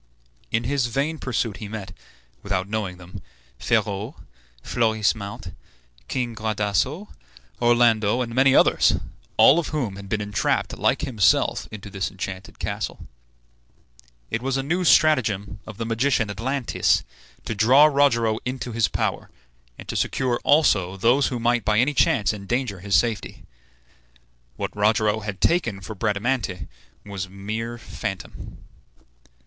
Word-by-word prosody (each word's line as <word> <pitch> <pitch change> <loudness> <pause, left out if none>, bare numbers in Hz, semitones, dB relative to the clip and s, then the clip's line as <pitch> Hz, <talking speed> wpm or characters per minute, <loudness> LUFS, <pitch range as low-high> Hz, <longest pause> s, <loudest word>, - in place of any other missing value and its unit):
In 110 +1 +1
his 130 0 0
vain 145 +6 -2
pursuit 115 -4 -2
he 105 - -7
met, 100 -3 -7 0.5
without 95 -2 -2
knowing 100 -4 -3
them, 90 0 -11 0.4
Ferrau, 105 +7 -1 0.5
Florismart, 110 -5 -1 0.5
King 125 -3 -2
Gradasso, 110 - -1 0.5
Orlando, 120 -1 +3
and 115 -2 -3
many 135 +2 +4
others, - - +4 0.4
all 155 - +7
of 170 - -3
whom 120 -11 -3
had 100 -1 -10
been 110 - 0
entrapped 105 -1 -1
like - - +1
himself 110 - +2
into 105 -1 -9
this 95 -1 -2
enchanted 95 -1 -7
castle. - - -4 1.3
It 115 - -1
was 135 +1 -1
a 135 - -1
new 175 +6 0
stratagem 105 - +3
of 110 -2 -9
the 115 - -3
magician 115 0 +1
Atlantes 125 +5 0 0.4
to - - -2
draw 125 +8 +6
Rogero 120 -7 +3
into 125 -1 -4
his 115 -2 +2
power, - - -2 0.5
and - - -11
to - - -5
secure 125 -3 0
also 95 - +3
those 120 +8 +3
who 125 - -3
might 120 0 +1
by 105 0 +1
any 130 +6 +3
chance 110 -6 +2
endanger 105 0 -3
his 100 +2 0
safety. 115 -5 0 1.1
What - - -5
Rogero 110 +1 +2
had 105 -2 -6
taken 120 - +1
for 105 +3 -7
Bradamante 105 - -2 0.4
was 100 -2 -5
a - - -19
mere 110 +5 -5
phantom. 120 - -7
110 Hz, 135 wpm, -23 LUFS, 100-125 Hz, 1.3 s, all